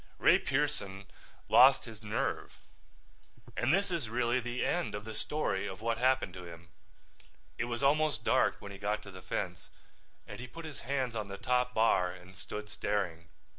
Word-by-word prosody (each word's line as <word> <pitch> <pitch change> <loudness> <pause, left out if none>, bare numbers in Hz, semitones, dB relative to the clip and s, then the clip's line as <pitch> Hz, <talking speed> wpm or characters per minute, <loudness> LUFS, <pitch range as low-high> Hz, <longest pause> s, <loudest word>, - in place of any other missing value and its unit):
Ray - - +6
Pearson 95 0 -1 0.4
lost 135 +2 +7
his 110 -2 -10
nerve 105 -1 -2 1.0
and 120 +2 +2
this 195 +2 +2
is 165 -10 -2
really 120 +1 +1
the 120 0 -2
end 175 -8 0
of 105 0 -6
the 110 - -6
story 150 +7 -1
of 95 - -6
what 115 +1 -1
happened 130 -7 +2
to 90 -1 -8
him. 85 -1 -11 0.9
It 120 - +1
was 120 +2 -3
almost 145 -4 +3
dark - - +3
when 100 - -9
he 100 - -9
got 105 +1 -1
to 100 - -10
the 95 -1 -10
fence - - -4 0.6
and - - -9
he 125 - -6
put 165 +6 -9
his 150 -3 -8
hands 130 -2 -2
on 110 -2 -2
the 100 0 -6
top 125 +1 +1
bar 110 -5 +3
and 90 +1 -13
stood 105 +3 -6
staring. 90 -6 -2
115 Hz, 180 wpm, -32 LUFS, 100-130 Hz, 1.0 s, lost